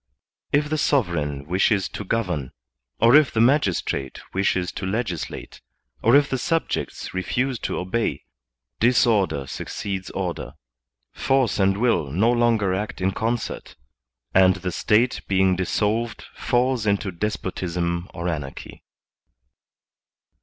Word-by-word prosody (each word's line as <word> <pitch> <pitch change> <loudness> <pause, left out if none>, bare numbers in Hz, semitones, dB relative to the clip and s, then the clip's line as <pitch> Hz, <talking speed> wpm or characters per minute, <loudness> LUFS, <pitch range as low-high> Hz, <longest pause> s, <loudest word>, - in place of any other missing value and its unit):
If 150 +1 +2
the 155 +1 -1
sov 135 -11 +2
ereign 75 -4 -3
wishes 95 +4 +2
to - - -6
govern, 90 - -2 0.5
or 115 +4 +6
if 150 -2 +6
the 110 - -1
magistrate 105 - +1
wishes 95 -2 0
to 95 - -5
legislate, 95 -5 -4 0.4
or 115 +4 +5
if 145 0 +5
the 130 - -2
subjects 165 +5 -2
refuse 125 +7 -1
to - - -3
obey, 100 +6 -2 0.6
disorder 110 - +3
suc - - -6
ceeds 95 -2 -4
order, - - -3 0.6
force 135 -6 +1
and 95 0 +3
will 115 - +1
no 100 - +2
longer 115 -5 +2
act 105 +3 -3
in 95 +1 +1
concert, 115 +4 -3 0.6
and 95 -1 +5
the 90 -1 -4
State 110 +8 +2
being 95 -1 +3
dissolved 105 +5 -1
falls 125 -2 0
into 100 -1 +1
despotism 90 -2 -3
or 85 -1 -5
anarchy. 75 -5 -6
100 Hz, 125 wpm, -23 LUFS, 90-120 Hz, 0.6 s, or